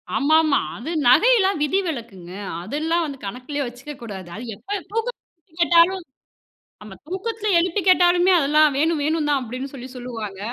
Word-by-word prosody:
ஆமாமா. 310 Hz, 0 st, +3 dB, 0.2 s
அது 255 Hz, +9 st, -7 dB, 0.2 s
நகைலாம் 395 Hz, -, +4 dB
விதி 375 Hz, +7 st, +1 dB
விலக்குங்க. 220 Hz, -, -7 dB, 0.3 s
அதெல்லாம் 320 Hz, -, -1 dB
வந்து 280 Hz, -2 st, -6 dB
கணக்குலயே 255 Hz, +6 st, -4 dB
வச்சுக்கக்கூடாது. 240 Hz, -7 st, -9 dB
அது 230 Hz, -, -7 dB
எப்ப 400 Hz, -, -5 dB
தூக்கத்தில 455 Hz, +2 st, -3 dB
போய் 330 Hz, 0 st, -29 dB
கேட்டாலும் 345 Hz, +2 st, +4 dB, 0.8 s
நம்ம 210 Hz, -2 st, -11 dB
தூக்கத்தில 425 Hz, +4 st, -4 dB
எழுப்பி 365 Hz, +3 st, 0 dB
கேட்டாலுமே, 360 Hz, 0 st, +5 dB
"அதெல்லாம் 300 Hz, 0 st, +4 dB
வேணும், 315 Hz, 0 st, +1 dB
வேணுந்தான்" 295 Hz, -3 st, +1 dB
அப்படின்னு 255 Hz, +3 st, -5 dB
சொல்லி 255 Hz, -1 st, -8 dB
சொல்லுவாங்க. 225 Hz, -6 st, -7 dB
300 Hz, 135 wpm, -22 LUFS, 250-355 Hz, 0.8 s, கேட்டாலுமே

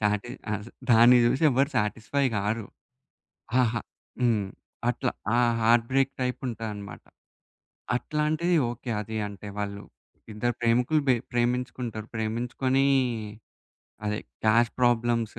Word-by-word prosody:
సాటి 105 Hz, +2 st, 0 dB, 0.2 s
ఆస 105 Hz, 0 st, -4 dB, 0.2 s
దాన్ని 120 Hz, +2 st, +7 dB
జూసి 130 Hz, +6 st, +2 dB
ఎవరు 135 Hz, +3 st, +2 dB
సాటిస్‌ఫై 110 Hz, +6 st, 0 dB
గారు. 105 Hz, +2 st, -1 dB, 0.9 s
హాహా 120 Hz, -3 st, +2 dB, 0.4 s
హ్మ్. 110 Hz, -5 st, +2 dB, 0.4 s
అట్లా -, -, 0 dB, 0.2 s
ఆ -, -, +3 dB, 0.2 s
హార్ట్ 115 Hz, +1 st, +4 dB
బ్రేక్ 135 Hz, 0 st, +3 dB
టైప్ 125 Hz, -1 st, -1 dB
ఉంటదన్నమాట. 105 Hz, -4 st, -6 dB, 0.9 s
అట్లాంటిది 155 Hz, +6 st, 0 dB
ఓకే. 120 Hz, +1 st, -7 dB
అది 110 Hz, +1 st, -5 dB
అంటే 100 Hz, 0 st, -9 dB
వాళ్ళు 100 Hz, 0 st, -4 dB, 0.5 s
ఇద్దరు 120 Hz, +3 st, -1 dB
ప్రేమికులు, 125 Hz, +6 st, +3 dB
బె 130 Hz, -, +5 dB, 0.2 s
ప్రేమించుకుంటారు. 120 Hz, -2 st, -2 dB
ప్రేమించుకుని 120 Hz, +5 st, 0 dB, 1.2 s
అదే 105 Hz, 0 st, -1 dB, 0.3 s
క్యాస్ట్ 115 Hz, +2 st, +3 dB
ప్రాబ్లమ్స్ 120 Hz, -2 st, +1 dB
120 Hz, 110 wpm, -27 LUFS, 110-125 Hz, 1.2 s, దాన్ని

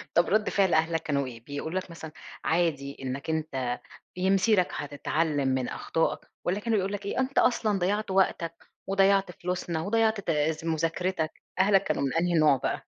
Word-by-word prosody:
طب 170 Hz, -, +4 dB
رد 215 Hz, +2 st, +2 dB
فعل 195 Hz, -3 st, +2 dB
أهلك 165 Hz, +1 st, +2 dB
كانوا 140 Hz, -2 st, 0 dB
إيه، 115 Hz, -2 st, -10 dB
بيقولوا 160 Hz, +5 st, -3 dB
لك 185 Hz, -, -10 dB
مثلًا 160 Hz, -2 st, -8 dB, 0.3 s
عادي 155 Hz, -5 st, 0 dB
إنك 135 Hz, +4 st, -4 dB
أنتَ 135 Hz, -6 st, -2 dB, 0.4 s
بي 185 Hz, +1 st, 0 dB
مسيرك 195 Hz, -1 st, +4 dB
هتتعلم 145 Hz, 0 st, -1 dB
من 130 Hz, -1 st, 0 dB
أخطائك 165 Hz, -, -1 dB, 0.2 s
والّا 190 Hz, +4 st, 0 dB
كانوا 225 Hz, 0 st, 0 dB
بيقولوا 195 Hz, +1 st, -1 dB
لك 200 Hz, -, -14 dB
إيه: 200 Hz, -, -2 dB
"أنتَ 260 Hz, +1 st, -1 dB
أصلًا 215 Hz, -5 st, +3 dB
ضيعت 200 Hz, +3 st, 0 dB
وقتك 175 Hz, -3 st, +1 dB, 0.3 s
وضيعت 195 Hz, -1 st, +3 dB
فلوسنا 175 Hz, -2 st, -3 dB
وضيعت 220 Hz, +3 st, +2 dB
تا 160 Hz, -2 st, -1 dB
مذاكرتك." 165 Hz, +1 st, -1 dB, 0.2 s
أهلك 195 Hz, 0 st, +5 dB
كانوا -, -, -1 dB
من 135 Hz, -, -1 dB
أي 175 Hz, +1 st, +1 dB
نوع 150 Hz, -3 st, +5 dB
بقى؟ -, -, -2 dB
170 Hz, 170 wpm, -28 LUFS, 155-195 Hz, 0.4 s, أهلك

